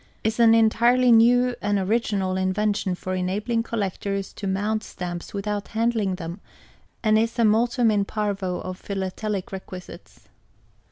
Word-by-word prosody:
_ - - -31 0.2
Is 220 +1 -1
an 230 -1 +7
entirely 235 +3 +4
New 245 +2 +5
and 205 0 +1
Original 195 -2 0
Invention 190 0 0
for 185 +1 -5
enabling 200 +6 -1
Collectors 200 -3 -3
to 200 - -5
Mount 210 +3 -1
Stamps 175 -3 -6
without 205 0 -3
handling 225 -4 0
them, 175 +1 -7 0.6
and 215 -1 +4
is 230 +1 -1
a 235 - +3
multum 230 +2 +3
in 205 -1 +2
parvo 200 -4 -2
of 185 0 -6
Philatelic 195 0 -4
requisites. 185 -1 -10
210 Hz, 145 wpm, -24 LUFS, 190-225 Hz, 0.6 s, an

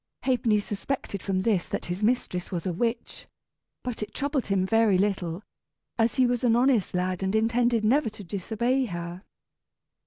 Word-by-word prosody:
Ha'penny 235 -5 +2
suspected 205 0 -4
from 185 -1 -1
this 200 -6 +1
that - - -3
his 180 +4 -4
mistress 210 -6 0
was 175 -3 -3
a 185 - -1
witch; 230 +5 -3 0.6
but 250 -3 -4
it 210 0 -5
troubled 285 -2 -1
him 195 -2 +1
very 225 -1 +3
little, 185 -2 -1 0.6
as 225 0 +2
he 260 - +4
was 245 -1 0
an 235 -2 +4
honest 245 -6 +2
lad 180 0 -1
and 190 +2 0
intended 230 0 +2
never 250 +2 +3
to 210 -1 -11
disobey 225 +8 -1
her. 175 -2 -6
215 Hz, 165 wpm, -27 LUFS, 185-240 Hz, 0.6 s, he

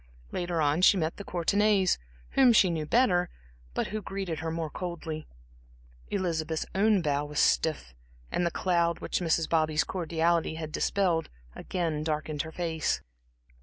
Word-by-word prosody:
Later 175 -3 -1
on 150 +4 +2
she 190 - +6
met 160 -2 -1
the 200 - -6
Courtenays, 195 +2 +2 0.3
whom 260 -3 +5
she 190 -5 +5
knew 155 -2 -2
better, 180 -5 +3 0.5
but - - -1
who 215 +1 -3
greeted 190 -5 -4
her 165 - -3
more 160 -1 -3
coldly. 165 -3 -5 0.8
Elizabeth's 160 -4 -1
own 200 -1 +3
bow 145 -1 +1
was 150 0 -3
stiff, - - +1 0.4
and 175 - 0
the 170 - +2
cloud 170 -1 +1
which - - -2
Mrs. 165 -2 +1
Bobby's 155 -1 +2
cordiality 170 -2 0
had 160 -1 -5
dispelled, 175 -2 +1 0.3
again 165 -5 -2
darkened 155 -1 -2
her 160 - -7
face. 165 -2 -1
170 Hz, 150 wpm, -28 LUFS, 155-185 Hz, 0.8 s, she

